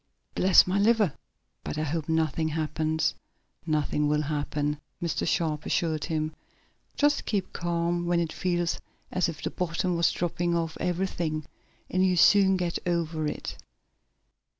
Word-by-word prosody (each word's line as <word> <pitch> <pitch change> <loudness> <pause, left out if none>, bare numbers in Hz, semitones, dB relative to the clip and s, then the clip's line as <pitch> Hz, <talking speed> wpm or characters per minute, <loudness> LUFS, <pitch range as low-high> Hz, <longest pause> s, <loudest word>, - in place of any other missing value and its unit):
"Bless 185 -1 +6
my 185 +2 0
liver, 210 -5 +3 0.5
but - - -4
I 155 - 0
hope 155 +1 -2
nothing 160 -1 +1
happens." 155 0 0 0.5
"Nothing 150 -1 +1
will 150 +1 +1
happen," 150 0 -2 0.2
Mr. 170 -1 -1
Sharp 155 -3 0
assured 160 -3 0
him. 155 -2 -2 0.6
"Just 290 0 +2
keep 195 -3 -1
calm, 170 0 -1
when 175 0 +2
it 165 -2 -1
feels 175 -2 0 0.3
as 185 -2 +1
if 165 - -7
the - - -2
bottom 180 0 -1
was 170 0 +3
dropping 175 0 -1
out 165 -1 0
of - - -12
everything 170 -4 -1 0.4
and 185 +1 +1
you'll 185 -1 +3
soon 190 +2 +6
get 175 -2 -1
over 165 -3 0
it. - - -5
170 Hz, 150 wpm, -27 LUFS, 155-180 Hz, 0.6 s, Bless